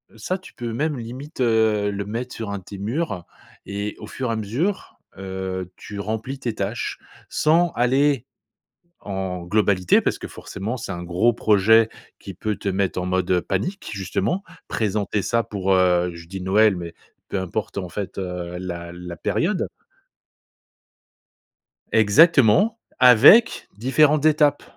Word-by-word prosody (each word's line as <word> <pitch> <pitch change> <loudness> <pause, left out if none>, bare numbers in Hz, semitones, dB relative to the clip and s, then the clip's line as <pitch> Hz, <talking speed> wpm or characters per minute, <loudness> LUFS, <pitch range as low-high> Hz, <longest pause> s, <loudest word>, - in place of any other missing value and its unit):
ça 185 - -3
tu 185 - -15
peux 120 -1 -5
même 150 +5 -1
limite, 130 +5 -7
heu, 110 -3 +2
le 100 0 -4
mettre 120 +5 -5
sur 110 -2 -5
un 100 - -3
de - - -18
tes 100 - -9
murs, 125 - -2
heu 90 - -6 0.4
et 100 +1 -4
au - - -8
fur 130 -2 -4
et - - 0
à - - -1
mesure, 125 - -2 0.2
heu, 95 -1 -5
tu 105 0 -9
remplis 110 +6 -4
tes 120 -4 -3
tâches - - -3 0.3
sans 165 +2 +3
aller 130 +1 +2 0.7
en 95 -3 -4
globalité. 95 -1 +3
Parce - - -1
que, - - -6
forcément, 100 +5 -6
c'est 110 -5 -6
un 85 -1 -5
gros 90 +7 +2
projet 110 +1 +4 0.3
qui 95 - -9
peut 105 +3 -3
te - - -6
mettre 95 -1 -1
en - - -3
mode, 95 0 0
heu, 90 -1 +3
panique 190 - -3
justement, 100 - -2 0.2
présenter 105 -1 -1
ça 115 +3 0
pour, 95 -3 -2
heu, 90 -1 +3
je 85 0 -11
dis, 95 +1 -6
Noël, 100 +2 +4
mais 85 -1 -6 0.4
peu 100 - -1
importe 95 +4 -4
en 95 -2 -3
fait, 100 +1 -6
heu, 90 -2 -4
la 85 -2 -6
la 85 0 -8
période. - - -1 2.2
Exactement, 145 - +5 0.2
avec 125 - +7
différentes 145 +6 +3
étapes 150 -2 +3
105 Hz, 155 wpm, -22 LUFS, 95-125 Hz, 2.2 s, avec